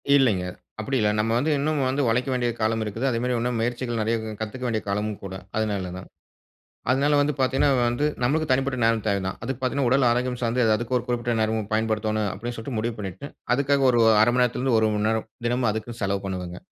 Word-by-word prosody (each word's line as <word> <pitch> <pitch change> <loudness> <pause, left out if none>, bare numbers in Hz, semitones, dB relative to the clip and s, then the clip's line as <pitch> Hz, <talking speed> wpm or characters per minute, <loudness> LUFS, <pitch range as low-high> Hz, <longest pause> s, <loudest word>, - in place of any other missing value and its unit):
இல்லைங்க. 115 -10 +3 0.4
அப்டி 135 +5 -1
இல்ல 105 -1 +3
நம்ம 110 +1 +1
வந்து 150 +5 +1
இன்னும் 155 +1 0
வந்து 135 +3 0
உழைக்க 125 +4 +1
வேண்டிய 120 -1 0
காலம் 110 +1 +1
இருக்குது. 110 +5 -3
அதே 115 - 0
மாரி 125 0 0
இன்னும் 120 0 -1
முயற்சிகள் 120 0 -2
நறைய 110 +2 +1 0.3
கத்துக்க 110 +4 -5
வேண்டிய 110 -2 -1
காலம் 105 +2 -1
கூட, 95 -1 -6 0.2
அதுனால 100 -4 -1
தான். 95 - -9 0.8
அதுனால 145 +3 +3
வந்து 150 +1 +1
பாத்தீங்கன்னா 135 +2 +2 0.2
வந்து, 120 +5 0 0.2
நம்மளுக்கு 150 +4 +1
தனிப்பட்ட 135 0 +1
நேரம் 115 -2 +2
தேவ 100 -1 +2
தான். 95 - -4
அதுக்கு 130 +2 -4
பாத்தீங்கன்னா 130 0 0
உடல் 130 -1 +4
ஆரோக்கியம் 125 +1 0
சார்ந்து 120 +2 +1
அதுக்கு 120 +2 -2
ஒரு 125 - -5
குறிப்பிட்ட 120 -1 -1
நேரம் 110 -1 -1
பயன்படுத்தோணும், 110 -1 0
அப்டின்னு 120 +4 -6
சொல்ட்டு 115 +1 -5
முடிவு 115 +1 -2
பண்ணிட்டு, 95 +7 -6 0.3
அதுக்காக 140 0 +2
ஒரு 120 -1 +3 0.2
1/2 - - +2
மணி 125 - +4
நேரத்துலருந்து 125 0 +1
1 110 - +3
மணி 105 +1 +1
நேரம். 110 0 -1 0.2
தினமும் 120 -1 +1
அதுக்குன்னு 115 +2 -6
செலவு 100 0 0
பண்ணுவேங்க. 90 -2 -5
120 Hz, 205 wpm, -24 LUFS, 110-130 Hz, 0.8 s, உடல்